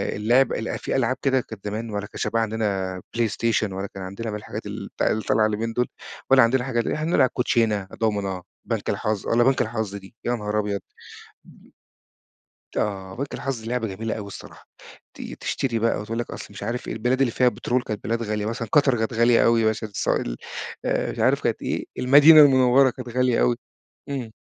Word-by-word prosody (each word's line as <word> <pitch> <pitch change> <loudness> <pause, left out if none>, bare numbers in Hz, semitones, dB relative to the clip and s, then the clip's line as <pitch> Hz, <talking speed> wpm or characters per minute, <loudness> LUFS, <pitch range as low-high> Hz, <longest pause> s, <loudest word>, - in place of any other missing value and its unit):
اللعب 120 +6 +3
ال 110 - -3
في - - -3
ألعاب 130 -1 +1
كده 135 -2 +2
كانت 110 -4 -11
زمان 110 +2 -4
ولا 105 -1 -4
كانش - - -4
بقى 115 - +1
عندنا 100 -4 -2 0.2
PlayStation 115 -2 +1
ولا 95 +1 -4
كان 95 -1 -7
عندنا 100 +5 -5
من 105 - -4
الحاجات - - -7
ال - - -6
بتاع - - +1
اللي 110 - 0
طالعة 110 - +3
اليومين 110 +2 -1
دول 125 +1 +1 0.4
ولا 135 -1 +7
عندنا 125 +2 +2
حاجة 125 -2 -1
ل 115 - -1
إحنا 155 +2 -2
نلعب 130 -6 +4
كوتشينة، 110 -5 +1
دومنة، 100 -4 -1 0.2
بنك - - -2
الحظ 105 -2 -1
والّا 120 +1 +3
بنك 135 +1 +3
الحظ 110 -3 -2
دي، 100 +2 -11
يا 120 0 +1
نهار 105 -1 -2
أبيض! 100 -1 -1 0.7
م - - -19 1.1
آه، 95 -2 -2
بنك 140 +3 -4
الحظ 130 -4 -4
لعبة 120 -1 -1
جميلة 110 +3 -3
أوي 105 -2 -6
الصراحة، 100 - -11 0.5
ت - - -10 0.2
تشتري 120 -4 -1
بقى 115 0 +1
وتقول 115 +2 -4
لك 120 - -3
أصْل - - -7
مش 100 - -10
عارف 120 +1 -3
إيه - - -2
البلاد 125 +4 0
اللي 130 - +3
فيها 125 +2 +4
بترول 125 +1 -1
كانت 110 -3 -5
بلاد 115 +2 -1
غالية، 105 -1 -2
مثلًا 115 0 -3
قطر 140 -4 +4
كانت 110 +2 -1
غالية 115 +1 +4
أوي 115 -1 +4
عشان 110 0 -2
السوائل - - -1 0.5
آآ، - - 0
مش - - -10
عارف - - +2
كانت - - -1
إيه؟ - - -2
المدينة 145 +5 +8
المنوّرة 130 -2 +6
كانت 125 0 -9
غالية 125 0 +1
أوي، - - +3 0.5
إمم. 130 -5 -4
115 Hz, 200 wpm, -24 LUFS, 105-125 Hz, 1.1 s, المدينة